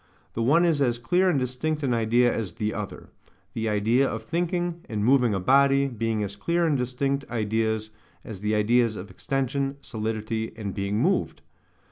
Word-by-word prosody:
The 115 - -3
one 155 +9 +4
is 160 -4 +2
as 120 -3 +2
clear 180 +10 +2
and 165 - +2
distinct 135 +4 -2
an 130 -3 +1
idea 120 +2 +2
as 105 -6 -3
the 110 -1 -2
other: 105 -2 -6 0.4
the 110 -1 -2
idea 115 +6 +2
of - - -5
thinking, 175 +1 -2
and 105 -2 -1
moving 125 -4 +4
a - - -1
body, 140 +6 +4
being 115 -3 -1
as 100 0 -5
clear 170 +10 0
and 155 -3 +2
distinct 135 +2 -1
ideas 110 -1 -1 0.3
as 110 -6 -7
the 105 +2 0
ideas 115 +1 +2
of 100 +1 -8
extension, 135 0 -2
solidity, 110 -2 -3
and 100 -3 -4
being 100 0 -2
moved. - - 0
120 Hz, 175 wpm, -26 LUFS, 110-140 Hz, 0.4 s, one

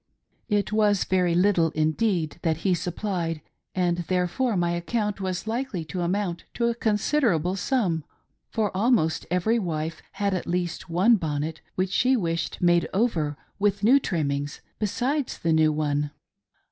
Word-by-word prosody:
It 205 -1 +1
was 210 -2 +3
very 180 -2 +1
little 180 -3 +3
indeed 160 +1 0
that 160 -2 +1
he 190 - +4
supplied, 175 -2 -2 0.4
and 175 -1 +1
therefore 180 +6 0
my 175 -1 +1
account 205 +4 -2
was 185 0 -2
likely 220 -7 -3
to 180 +3 -4
amount 175 -1 -1
to 235 - +1
a 235 - +2
considerable 210 - +1
sum, 190 - 0 0.5
for 210 -5 -1
almost 195 -6 +2
every 180 +7 +2
wife 165 -4 -3
had 200 0 0
at 185 - -3
least 175 0 -2
one 195 +8 +4
bonnet 155 -1 -3
which 185 0 0
she 255 +6 +3
wished 165 -3 -2
made 175 -1 +4
over 165 -10 +1 0.2
with 205 0 +1
new 255 +6 +6
trimmings, 145 - -2 0.2
besides 250 +6 -1
the 165 -1 +1
new 155 -1 +4
one. 150 -1 0
180 Hz, 145 wpm, -25 LUFS, 165-210 Hz, 0.5 s, new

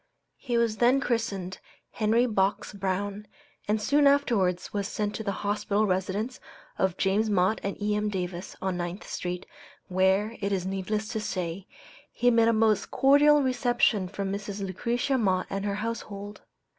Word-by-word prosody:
He 245 -3 -1
was 230 -2 +1
then 245 +4 +4
christened 200 -8 -2 0.3
Henry 225 +3 +2
Box 200 -4 0
Brown, 200 +1 -3 0.4
and 215 +1 +1
soon 285 +7 +3
afterwards 225 -11 +2
was 200 -1 -1
sent 210 0 -2
to 220 - -4
the 200 - -1
hospitable 205 +1 +1
residence 200 +5 -1 0.4
of 190 -2 +1
James 205 +3 +1
Mott 195 +1 +2
and 200 - -4
E.M. 210 0 0
Davis, 180 -2 -4
on 190 -2 -1
Ninth 175 +2 -4
street, 180 0 -4 0.4
where, 190 +4 +2
it 200 0 -1
is 185 -2 -1
needless 195 +3 -2
to 220 - -2
say, 185 -2 -4 0.4
he 245 0 +2
met 230 -1 +4
a - - +5
most 220 -2 +2
cordial 290 +2 +5
reception 240 -6 +2
from 195 +1 -4
Mrs. 200 0 -4
Lucretia 240 +7 -1
Mott 185 -4 +1
and 195 0 -2
her 200 -1 -1
household. 210 -2 -5
205 Hz, 155 wpm, -27 LUFS, 190-230 Hz, 0.4 s, a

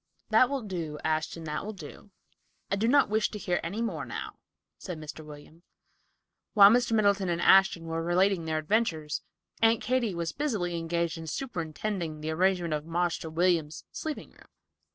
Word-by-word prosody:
"That 230 +3 +5
will 275 -3 -2
do, 170 -7 -4
Ashton; 160 +1 -1
that 150 -1 -3
will 215 +2 -5
do. 200 +1 -11 0.6
I - - +3
do 215 +3 0
not 280 +3 +5
wish 215 +1 +1
to 210 - -6
hear 180 -3 -1
any 200 +8 -3
more 230 - -3
now," - - -7 0.4
said 180 -4 -6
Mr. 155 0 -8
William. 150 +2 -13 0.9
While 200 -1 +9
Mr. 240 0 +2
Middleton 200 -3 +3
and 170 -1 0
Ashton 190 -2 +5
were 165 0 -2
relating 175 +1 +2
their 160 -1 -1
adventures, 155 -4 0 0.4
Aunt 225 0 +5
Katy 240 -6 0
was 170 -2 -3
busily 210 -13 -1
engaged 170 0 -2
in 160 - -8
superintending 170 - -4
the 155 +1 -3
arrangement 175 -1 +1
of 150 -1 -2
"Marster 170 -1 -1
William's" 165 -2 0
sleeping 310 -1 -5
room. - - -20
175 Hz, 170 wpm, -28 LUFS, 160-210 Hz, 0.9 s, While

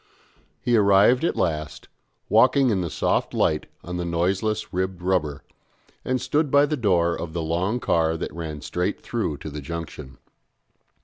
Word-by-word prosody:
He 120 - +2
arrived 105 +5 +5
at 170 - +1
last, 75 -3 -2 0.4
walking 130 +3 +4
in 95 -3 +1
the 85 - -2
soft - - 0
light 75 -1 +1 0.2
on 90 +1 -5
the 90 - -2
noiseless 95 +6 -1
ribbed 95 0 -2
rubber, 85 -6 0 0.6
and 130 0 0
stood 145 +4 0
by 140 +2 +5
the 150 - -1
door 90 - +2
of 80 -2 -6
the 85 -1 -2
long 90 +9 -1
car 80 -6 +1
that - - -5
ran 80 -3 -6
straight 90 +5 -2
through 75 - -2
to 80 +1 -8
the 75 +1 -6
Junction. 75 -3 -7
90 Hz, 165 wpm, -24 LUFS, 80-110 Hz, 0.6 s, arrived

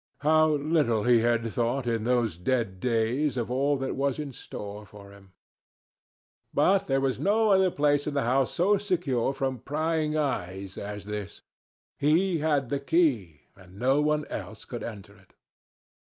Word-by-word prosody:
How 155 +1 +4
little 145 -7 +1
he 120 0 +5
had 115 0 +1
thought, 120 +4 -1
in 115 -2 -1
those 120 -6 +1
dead 95 +1 -1
days, 125 +5 0
of 120 0 -2
all 140 +3 +1
that 135 0 -3
was 140 0 0
in 145 -3 -5
store 105 -2 -8
for 100 -1 -14
him! 100 -2 -18 1.2
But 195 +1 +3
there 135 0 +2
was 135 -1 -1
no 215 +2 +2
other 190 -1 +4
place 145 -2 +1
in 150 - -3
the 140 - +1
house 130 +2 +1
so 195 +3 +2
secure 170 - 0
from 135 -2 -3
prying 155 +2 -1
eyes 95 -9 -3
as 105 0 -6
this. 105 -1 -6 0.6
He 165 +4 +2
had 145 -4 0
the 140 - -1
key, 135 - +1
and 95 0 -16
no 135 +5 +2
one 150 0 +1
else 105 +2 -7
could 120 -2 -6
enter 100 -2 -8
it. 95 -1 -25
130 Hz, 165 wpm, -27 LUFS, 110-150 Hz, 1.2 s, he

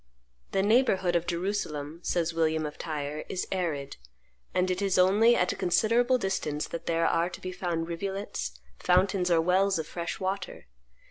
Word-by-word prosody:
"The 195 - +1
neighborhood 200 -5 +3
of 170 0 0
Jerusalem," 170 -4 -3
says 170 -1 0
William 160 -1 +1
of 150 - -7
Tyre, 150 -1 -4
"is 185 - -2
arid; 160 -7 -2 0.5
and 185 0 +1
it 185 +2 -2
is 195 -2 +1
only 205 +6 +5
at 180 - +2
a - - -4
considerable 235 +7 +2
distance 155 -8 -2
that 170 - -6
there 165 0 +2
are 170 +2 +2
to - - -9
be 185 - -5
found 175 -3 -2
rivulets, 190 - -4 0.2
fountains, 185 0 +2
or 170 -1 +4
wells 185 +3 +3
of 160 - -3
fresh 170 +1 -5
water. 190 - -4
180 Hz, 165 wpm, -28 LUFS, 165-195 Hz, 0.5 s, only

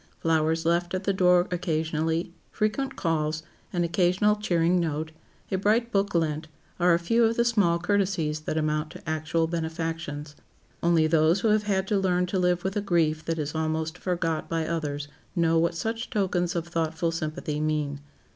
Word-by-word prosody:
Flowers 160 0 +1
left 175 +2 +1
at 185 - -3
the 200 - +1
door 180 -1 +4
occasionally, 165 -1 -1 0.2
frequent 260 +6 -1
calls, 155 -2 -1 0.3
an 175 -1 0
occasional 180 +4 +2
cheering 180 -4 +2
note, 160 -1 -2 0.4
a 190 - +1
bright 225 +4 +2
book 200 -2 0
lent, 155 -1 0 0.3
are 175 -1 +5
a - - +3
few 230 +8 +2
of 225 0 +2
the 235 - +3
small 205 -8 +3
courtesies 175 -4 0
that 155 +1 -3
amount 155 0 0
to 160 - -12
actual 160 +1 0
benefactions. 160 -3 -4 0.5
Only 170 -2 +3
those 160 +3 +3
who 225 - +2
have 210 0 +2
had 190 -1 +1
to 205 - +2
learn 180 -1 +2
to 185 +1 -1
live 180 -1 +1
with 190 0 -2
a 205 - +1
grief 160 -5 +1
that 165 0 -1
is 150 -1 -3
almost 160 0 -1
forgot 170 -3 -2
by 165 -1 -1
others 145 -3 -3 0.3
know 165 -1 +3
what 170 +1 +1
such 225 +6 -3
tokens 180 -4 0
of 170 -1 -2
thoughtful 165 0 -1
sympathy 155 -2 -3
mean. 150 -2 -1
170 Hz, 175 wpm, -26 LUFS, 160-185 Hz, 0.5 s, are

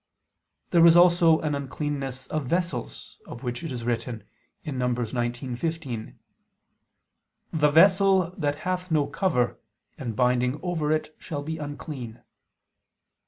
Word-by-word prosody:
There 170 - +5
was 170 0 +8
also 175 -2 +6
an 155 -2 -1
uncleanness 135 -1 -4
of 155 -4 -3
vessels, 170 -6 -3
of 120 - -9
which 120 +3 -4
it 165 - -4
is 120 -2 -5
written 115 -1 -3 0.4
(Num. 125 -5 -1
19:15): 120 +2 -3 1.4
"The 150 -2 +3
vessel 190 +2 +5
that 145 -1 -1
hath 185 0 -2
no 155 -3 +2
cover, 140 -12 0 0.4
and 120 -5 -4
binding 125 +3 +1
over 165 -4 -1
it, 155 0 -1
shall 145 -3 -5
be 160 +1 -4
unclean." 145 -5 -7
145 Hz, 120 wpm, -26 LUFS, 125-165 Hz, 1.4 s, was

